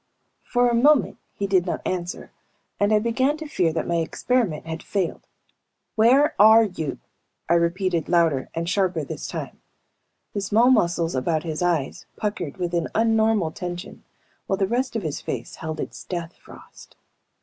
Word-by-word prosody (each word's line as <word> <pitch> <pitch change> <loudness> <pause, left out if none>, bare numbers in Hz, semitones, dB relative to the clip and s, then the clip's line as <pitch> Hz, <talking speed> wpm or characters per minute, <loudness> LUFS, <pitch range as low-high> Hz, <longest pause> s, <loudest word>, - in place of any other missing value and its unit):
For 245 0 +1
a 240 - +1
moment 275 +4 +3 0.2
he 200 - -2
did 190 -2 +2
not - - -3
answer 175 -1 -4 0.5
and 205 +1 +2
I 215 - +5
began 260 +7 +1
to 315 - -7
fear 180 - +1
that 160 - -2
my 170 - 0
experiment 170 0 -1
had 160 0 -5
failed. 190 -4 -3 0.7
"Where 260 +7 +4
are 220 +2 +8
you?" 160 -9 -4 0.5
I 170 - +3
repeated, 170 0 +1
louder 165 -6 +2
and 165 0 -2
sharper 185 -4 0
this - - -6
time. - - -6 0.7
The 200 - -2
small 225 +5 +4
muscles 170 -7 +2
about 155 +4 0
his 160 -1 -4
eyes 170 -6 -1
puckered 200 -8 -4
with 175 -2 -3
an 170 -1 0
unnormal 220 -6 +2
tension 175 0 -7 0.4
while 195 - 0
the 195 - +2
rest 245 +5 -1
of 225 - -2
his 155 -3 -3
face - - -5
held 160 -1 -5
its - - -6
death 170 -1 -5
frost. - - -16
185 Hz, 165 wpm, -23 LUFS, 165-225 Hz, 0.7 s, are